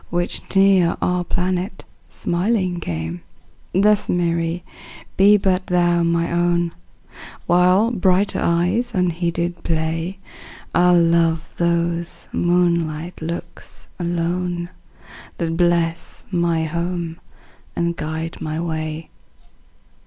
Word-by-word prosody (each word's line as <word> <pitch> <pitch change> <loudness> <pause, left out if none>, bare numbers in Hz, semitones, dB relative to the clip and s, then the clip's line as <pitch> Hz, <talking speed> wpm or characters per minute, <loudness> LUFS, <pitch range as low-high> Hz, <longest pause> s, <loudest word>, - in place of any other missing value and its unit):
Which 175 0 0
near 195 -3 +4
our 180 0 0
planet 180 +2 -2 0.2
smiling 180 0 -1
came; 85 - -4 0.5
Thus, 205 +2 +3
Mary, 170 0 0 0.5
be 205 +2 +6
but 190 -1 0
thou 175 -1 +2
my 170 0 +1
own; 175 0 +1 0.7
While 180 +6 +4
brighter 190 -2 +2
eyes 180 +8 +1
unheeded 175 -1 -1
play, 165 +3 -2 0.6
I'll 175 0 +5
love 165 -1 +2
those 170 0 -1
moonlight 170 -1 0
looks 170 +1 -7
alone, 175 0 -2 0.7
That 165 -1 -2
bless 170 -1 0
my 170 -2 +1
home 170 +1 -3 0.6
and 170 0 0
guide 160 +1 -5
my 155 0 -3
way. 160 -1 -4
170 Hz, 95 wpm, -21 LUFS, 165-180 Hz, 0.7 s, be